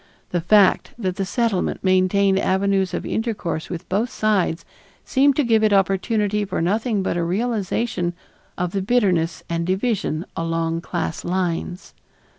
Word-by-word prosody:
The 175 - 0
fact 200 +2 +3
that 190 -5 -3
the 195 - -1
Settlement 200 0 -1
maintained 190 +1 +3
avenues 195 -1 +1
of - - -4
intercourse 210 -8 -3
with 175 +1 -6
both 215 +6 0
sides 200 -7 0 0.4
seemed 275 0 +3
to 295 - +2
give 225 -3 +3
it 215 - +4
opportunity 205 +2 +1
for 195 -2 -3
nothing 210 +4 0
but 180 - -1
a 170 - 0
realization 200 -1 -1 0.4
of 180 -1 -1
the 195 - -1
bitterness 185 -7 +1
and 170 0 -1
division 185 -3 -1
along 165 0 -1
class 170 -2 -3
lines. 180 0 -3
190 Hz, 145 wpm, -22 LUFS, 175-215 Hz, 0.4 s, it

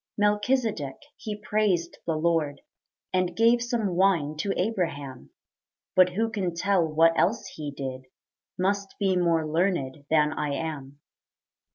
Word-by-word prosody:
Melchizedek 210 - +1 0.2
he 215 -2 -5
praised 205 -5 0
the 165 - +1
Lord, 155 -3 0 0.5
And 185 -1 +1
gave 235 +1 +4
some 235 -4 -1
wine 170 -6 +2
to 195 +6 -1
Abraham; 165 - -2 0.7
But 180 -1 +5
who 225 +4 0
can 185 -6 -2
tell 190 +1 +2
what 165 +2 +4
else 205 +8 +1
he 150 -2 -5
did 130 -2 -6 0.5
Must 200 +1 -1
be 195 -2 +2
more 170 -3 +2
learned 155 -4 -1
than 150 -1 +3
I 145 -2 -2
am. 145 -3 -5
175 Hz, 135 wpm, -26 LUFS, 150-200 Hz, 0.7 s, But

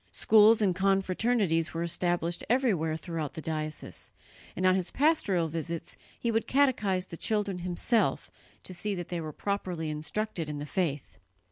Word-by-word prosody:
Schools 220 0 +5
and 190 -3 +3
confraternities 190 -3 +1
were 165 - -1
established 175 0 -1
everywhere 195 - +2
throughout 160 -3 -5
the - - -5
diocese, 155 -1 -5 0.4
and 185 - -1
on 185 - +6
his 185 -1 -1
pastoral 265 - +2
visits 165 +1 -4 0.2
he 235 - 0
would 225 0 0
catechize 215 -9 +2
the 170 - -9
children 205 -3 -1
himself 180 +6 +1 0.3
to 185 - -7
see 205 +3 -2
that 175 -2 -6
they 175 -2 -3
were 155 -1 -5
properly 180 -3 -3
instructed 165 +2 -3
in 150 - -4
the 145 - -5
faith. 150 -4 -3
180 Hz, 155 wpm, -29 LUFS, 165-210 Hz, 0.4 s, on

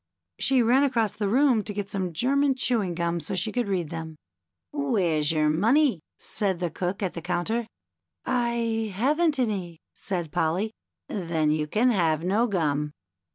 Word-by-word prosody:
She 265 -2 +4
ran 245 +4 +4
across 235 -7 +1
the 205 -2 -2
room 250 -2 +3
to 205 0 -5
get 205 -1 -3
some 190 -3 -3
German 270 - +2
chewing 225 -9 +1
gum 170 0 -1
so 165 +4 -4
she 190 +4 0
could 240 0 -1
read 180 -6 -2
them. 160 -1 -6 0.6
"Where's 190 - +1
your 155 -1 +2
money?" 230 - +3 0.2
said 195 -5 -2
the 175 -2 -2
Cook 185 +5 -3
at 185 - -1
the 170 - -6
coun 175 +1 -1
ter. 230 0 -1 0.4
" - - -46 0.2
I 225 -2 -1
haven't 295 - +2
any," 195 -9 -2 0.2
said 175 -6 -4
Polly. 180 +10 0 0.2
" - - -61
Then 165 -5 0
you 150 0 0
can 235 +10 +2
have 165 -6 +1
no 205 +7 +2
gum." 150 -7 -1
200 Hz, 175 wpm, -26 LUFS, 170-235 Hz, 0.6 s, She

